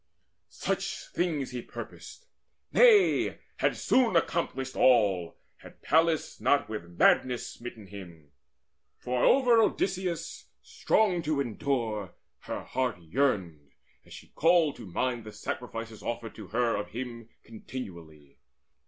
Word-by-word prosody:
Such - - -3
things 155 -7 -1
He 125 -1 -4
purposed 480 - -10 0.5
nay, 440 -6 +5 0.2
had - - +1
soon 240 -7 +2
accomplished 135 -6 0
all, 100 -9 +3 0.2
Had - - -16
Pallas 160 0 +2
not 145 - +3
with 85 -6 -7
madness 125 -2 +3
smitten 120 -3 -9
him; 85 -7 -12 0.7
For 125 0 -2
over 245 -4 +5
Odysseus, 185 -5 -1 0.2
strong 195 -6 +1
to 155 -2 -1
endure, 115 - -2 0.2
her - - -6
heart 125 -7 -2
Yearned, 85 - -1 0.3
as - - -21
she - - -12
called 165 -2 +3
to - - -10
mind 120 +6 -2
the 110 - -9
sacrifices 115 +1 -6
Offered 115 -1 -4
to 105 -4 -10
her 115 +2 +1
of 105 - -3
him 115 -1 -7
continually. 85 - -10
120 Hz, 120 wpm, -29 LUFS, 105-155 Hz, 0.7 s, nay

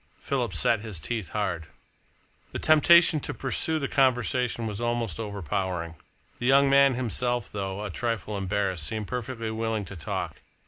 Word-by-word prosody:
Philip - - -1
set 115 - +2
his 105 -5 -6
teeth 110 0 -4
hard. 85 -6 -2 0.9
The - - -2
temptation 160 +1 +6
to - - -5
pursue 160 +4 0
the 140 -3 -2
conversation 125 -3 +1
was 105 0 -4
almost 120 -6 -1
overpowering. 95 -4 -3 0.5
The 120 - -1
young 135 +1 +5
man 140 -1 +5
himself, 120 -1 -1
though 100 0 -4
a 105 - -4
trifle 110 0 -3
embarrassed, 95 -4 -1
seemed 110 -2 -3
perfectly 120 -1 -4
willing 110 -2 -2
to 95 - -9
talk. 80 - -4
115 Hz, 150 wpm, -27 LUFS, 100-125 Hz, 0.9 s, temptation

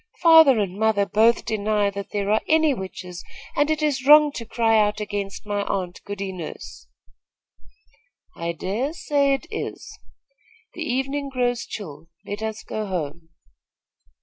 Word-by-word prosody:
"Father 320 -6 +8
and 200 -2 -2
mother 220 -2 +2
both 220 +4 +3
deny 210 -2 0
that 200 0 -7
there 205 0 -2
are 215 - +3
any 315 -2 +4
witches, 185 -4 -7 0.3
and 290 +1 +2
it 310 -1 0
is 280 -4 0
wrong 300 +1 +7
to 235 -4 -7
cry 225 -1 +2
out 210 0 +1
against 205 -1 -5
my 205 -1 -1
aunt, 180 -3 -3
Goody 200 -1 -4
Nurse." 175 -4 -9 1.5
"I 170 0 -3
dare 210 - -3
say 280 -4 +1
it 270 - -8
is. - - -6 0.7
The 340 - -8
evening 275 0 -2
grows 245 -2 -1
chill. 160 -6 -8 0.2
Let 205 +1 -5
us 220 0 -4
go 215 -1 -4
home." 165 -3 -5
215 Hz, 150 wpm, -23 LUFS, 195-270 Hz, 1.5 s, Father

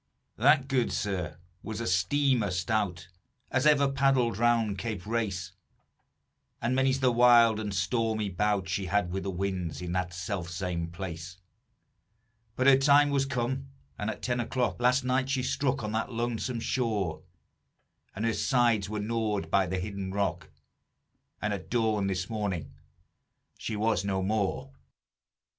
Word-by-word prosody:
"That, 135 +3 +4
good 130 -3 +1
sir, 90 -6 -2 0.2
was 110 0 -5
a 115 - -3
steamer 115 +5 +2
stout 90 -2 -1 0.4
As 130 +3 +2
ever 145 -2 +5
paddled 135 -5 +2
around 115 -4 +2
Cape 110 -6 -4
Race; 100 -6 -2 1.1
And 120 +2 0
many's 135 0 +2
the 130 -1 +4
wild 120 -2 +6
and 105 -2 -3
stormy 110 +3 0
bout 100 0 0
She 95 +1 -2
had 95 -2 +1
with 95 +1 -2
the 100 - -4
winds, 95 -3 -3
in 90 -1 -5
that 90 0 -1
self 90 0 -4
same 85 -1 -3
place; 85 -1 -7 1.2
But 130 - 0
her 135 -1 +8
time 145 +1 +5
was 135 -1 +1
come; 130 +1 -2 0.3
and 105 - -3
at - - -6
ten 125 -1 0
o'clock 120 +1 -1
Last 125 +2 +3
night 130 +1 0
she 135 -2 0
struck 135 0 0
on 105 - -3
that 110 +3 -2
lonesome 120 0 -2
shore; 110 -10 -1 0.9
And 110 +4 -2
her 115 - +1
sides 115 -3 +2
were 105 0 -3
gnawed 105 -6 -2
by 95 -2 +3
the 95 +2 -2
hidden 95 0 -4
rock, 90 -5 -2 0.9
And 105 -1 0
at 95 -2 -6
dawn 110 -4 +1
this 95 -1 -2
morning 95 -10 -3 0.8
she 110 - -4
was 105 -2 +1
no 95 -1 -1
more." 110 +6 -1
110 Hz, 150 wpm, -29 LUFS, 95-125 Hz, 1.2 s, her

